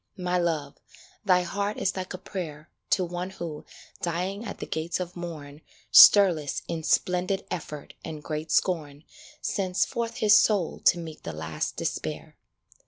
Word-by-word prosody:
My 180 -1 0
Love, 155 -5 -1 0.5
thy 180 -2 +4
heart 200 +3 -2
is 195 - 0
like 185 -1 -5
a - - -6
prayer 165 -5 -7 0.2
To 185 - +3
one 175 +1 -4
who, 170 -5 -7 0.4
dying 180 +5 -2
at 205 - -6
the - - -6
gates 160 +3 -3
of 180 -1 -5
morn, 155 -4 -8 0.3
Stirless, 175 -8 +7
in 165 -1 -3
splendid 180 +4 +1
effort 150 -4 -6
and 155 -2 -7
great 155 +1 -4
scorn, 150 -5 0 0.4
Sends 185 -2 0
forth 230 -1 -3
his 210 -1 +4
soul 200 -6 +3
to - - +6
meet 160 -2 -8
the 80 - -6
last 80 0 -4
despair. - - -4
175 Hz, 155 wpm, -27 LUFS, 155-185 Hz, 0.5 s, Stirless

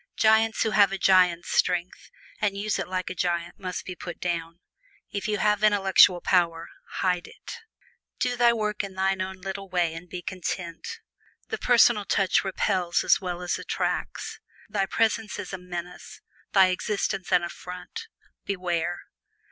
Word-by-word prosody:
Giants 220 0 +4
who 220 - 0
have 200 -1 +5
a 195 - -2
giant's 180 -3 +4
strength 180 0 0 0.3
and 205 -2 0
use 210 +1 -1
it - - -3
like 185 0 -3
a - - -3
giant 175 -1 -2
must 185 -2 -5
be 180 - -6
put 175 0 -8
down. 170 -1 -3 0.5
If 200 - -3
you 210 -1 0
have 210 +1 +1
intellectual 195 -3 +5
power, 170 -2 +1 0.3
hide 180 -2 0
it! - - -10 0.6
Do 250 - 0
thy 245 -1 +3
daily 235 0 +4
work 210 -1 -1
in 195 -1 -7
thine 190 0 +1
own 190 0 -5
little 195 0 -6
way 175 -3 +1
and 165 +2 -9
be 180 0 -6
content. 185 - -5 0.5
The 440 - -3
personal 235 -3 +4
touch 195 -1 +2
repels 185 -2 0
as - - +4
well 180 -1 -4
as 180 - -1
attracts. - - -3 0.3
Thy 195 -3 -1
presence 220 -1 0
is - - -6
a 185 - -4
menace 180 0 -8 0.3
thy 190 -2 +6
existence 195 0 -2
an 175 - +4
affront 180 - -7 0.4
beware! 175 -3 -2
185 Hz, 165 wpm, -26 LUFS, 180-205 Hz, 0.6 s, thy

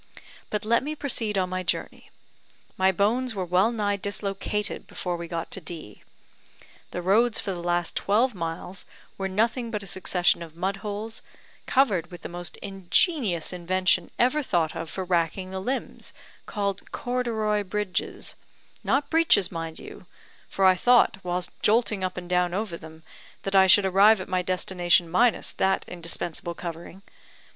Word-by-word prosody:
"But 210 0 -2
let 235 +2 +3
me 300 +4 -4
proceed 230 -8 0
on 185 -1 0
my 185 0 -1
journey. 175 - -3 0.7
My 190 0 +3
bones 225 +6 +1
were 190 -2 -2
well 185 +6 +3
nigh 205 -3 0
dislocated 200 +1 -2
before 180 -1 -3
we 170 0 -6
got 165 -1 -4
to 195 - -2
D. 155 - -9 0.9
The 180 - -5
roads 220 +5 +3
for 200 - -3
the 175 -2 -5
last 175 0 0
twelve 230 +5 +2
miles 175 +1 -5 0.4
were 195 - -1
nothing 230 +5 0
but 210 -3 -3
a - - -9
succession 180 -2 +1
of 165 -2 -9
mud 190 +3 -1
holes, 210 +2 -5 0.5
covered 205 - +2
with 175 -3 -11
the - - -5
most 175 -2 -5
ingenious 195 - +1
invention 180 0 +1
ever 255 +5 +3
thought 170 - 0
of 165 -1 -5
for 190 - -4
racking 180 +1 0
the 190 - -3
limbs, 260 +7 -4 0.3
called 200 -2 -3
corduroy 225 -4 -1
bridges; 200 -1 -3 0.5
not 285 +1 +1
breeches, 320 - +4
mind 165 -2 -5
you, - - -11 0.4
for 195 - +1
I 185 - +8
thought, 240 +2 +4
whilst 180 0 -3
jolting 215 -3 +2
up 185 0 -2
and 180 -1 -6
down 180 0 +1
over 205 -4 -2
them, 160 -1 -12 0.4
that 195 0 -2
I 190 0 +7
should 195 +2 +7
arrive 195 +3 +6
at 185 - -6
my 185 -1 0
destination 180 -1 +2
minus 225 +7 +2
that 190 0 +1
indispensable 170 0 -4
covering. 170 +3 -8
190 Hz, 160 wpm, -26 LUFS, 175-215 Hz, 0.9 s, I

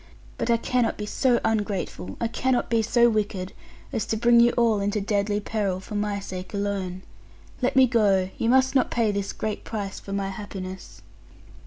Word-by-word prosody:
But - - -1
I 235 - +4
cannot 245 0 0
be 210 - -4
so 245 +3 +2
ungrateful, 200 - -2
I - - 0
cannot 245 +2 0
be 230 -1 +3
so 235 +2 +4
wicked, 205 -4 -1 0.4
as 220 - 0
to 220 - -1
bring 235 +1 +5
you 235 0 +6
all 230 -3 +3
into 205 +2 0
deadly 205 0 0
peril, 200 -3 -2
for 190 - -10
my 205 -1 -1
sake 185 0 -7
alone. 195 -2 -3 0.6
Let 255 - +1
me 265 0 +7
go: 200 -6 +2
you 230 - +1
must 260 +1 +4
not 260 -2 +3
pay 230 -3 +1
this 200 -1 -2
great 215 -1 -4
price 205 -3 -5
for 195 - -10
my 195 0 -1
happiness.' 190 -2 -8
210 Hz, 185 wpm, -25 LUFS, 195-235 Hz, 0.6 s, me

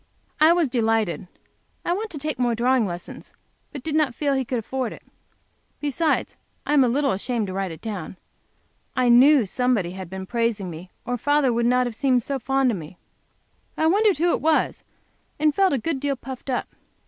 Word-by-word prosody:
I 315 +2 +7
was 340 -3 +3
delighted. 225 -7 0 0.6
I 345 - +1
want 430 +4 -3
to 315 - -8
take 295 -2 -4
more 240 -2 +1
drawing 245 -1 +2
lessons, 175 -1 -8 0.4
but 280 -4 -8
did 315 - -3
not 300 -6 +1
feel 290 +2 0
sure - - +1
he 260 - -2
could 250 - -2
afford 250 +1 -3
it. - - -14 0.8
Besides 300 +2 0 0.3
I 295 - 0
am 285 -3 +6
a 250 - +2
little 275 +2 +1
ashamed 225 +3 -1
to 185 - -6
write 195 0 -2
it 160 -1 -9
down 200 -5 -6 0.8
I 250 -1 +2
knew 260 +1 +6
somebody 230 -4 0
had 185 -1 -8
been 190 0 -6
praising 230 -4 -1
me 170 +3 -9 0.2
or 245 0 -2
father 290 -1 +2
would 235 0 +1
not 250 +1 +3
have 240 - -3
seemed 255 0 +1
so 275 +1 -3
fond 270 +1 +1
of 210 - -2
me. 165 +2 -10 0.8
I 315 - +1
wondered 405 +2 +3
who 345 +3 +2
it - - 0
was, 315 0 +1 0.5
and 305 0 +2
felt 385 +3 +3
a 275 - +2
good 270 +4 -2
deal 280 0 -1
puffed 260 +1 -9
up. 250 - -1
250 Hz, 205 wpm, -23 LUFS, 225-290 Hz, 0.8 s, I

